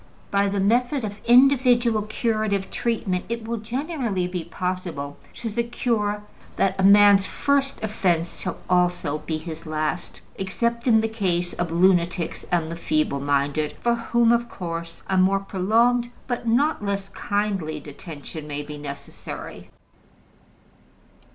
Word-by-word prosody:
By 200 0 +3
the 200 0 -1
method 245 +5 +2
of 205 0 -7
individual 245 -3 +5
curative 215 -2 -1
treatment 205 -6 -1
it 230 -1 -4
will 235 0 -2
generally 235 - -2
be 180 -1 -4
possible 180 -7 -4 0.2
to 235 - -5
secure 225 -2 -1 0.3
that 195 - +2
a - - +2
man's 200 0 +7
first 275 -3 0
offense 175 -6 0
shall - - -3
also 175 -4 +1
be 155 +1 -3
his 160 0 -8
last, 155 +2 -3 0.2
except 235 +6 -1
in 220 -2 +6
the 225 - 0
case 180 -6 -1
of 175 -2 -2
lunatics 175 -1 +2
and 165 -2 +1
the - - -3
feeble 300 - 0
minded, 145 +2 0
for 235 - +2
whom 235 0 +2
of 235 0 +2
course 165 -1 -6
a 190 - 0
more 195 +1 +4
prolonged 230 +6 +2 0.2
but 245 -1 -3
not 270 +2 +2
less 200 -1 -2
kindly 195 -7 -2
detention 150 +1 -9
may 145 0 -4
be 150 0 -8
necessary. 140 -1 -8
195 Hz, 140 wpm, -24 LUFS, 170-235 Hz, 0.3 s, man's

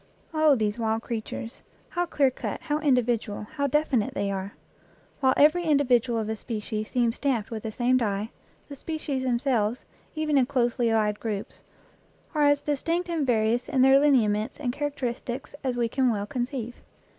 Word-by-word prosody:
Oh, 310 -2 +5
these 215 -1 -1
wild 225 0 0
creatures! 230 +1 -5 0.3
How 350 0 -1
clear 280 -5 +2
cut, - - -5
how 300 -1 -1
individual, 240 -7 +1
how 280 -2 0
definite 275 -6 +1
they 200 0 -1
are! 195 +1 -4 0.7
While 260 -2 +3
every 325 +4 +5
individual 255 -6 +3
of 220 -1 -2
a 220 - -2
species 215 -1 -4
seems 240 -2 +1
stamped 245 -7 -1
with 220 -1 -4
the 220 - -4
same 245 +3 +2
die, 210 -2 -1 0.4
the 285 - -8
species 295 -2 -3
themselves, 245 -3 0 0.3
even 305 -2 +2
in 250 - +2
closely 245 -3 +1
allied 210 -2 +1
groups, 210 -3 -5 0.7
are 300 -2 +3
as 290 0 +4
distinct 330 +5 -1
and 320 -5 -1
various 230 +1 +1
in 260 -1 +3
their 270 +1 +7
lineaments 225 -7 +2
and 250 -4 -2
characteristics 265 -3 -4
as 255 -2 -1
we 235 -1 +1
can 260 +2 +1
well 205 -2 -2
conceive. 245 +1 -4
245 Hz, 170 wpm, -26 LUFS, 220-285 Hz, 0.7 s, their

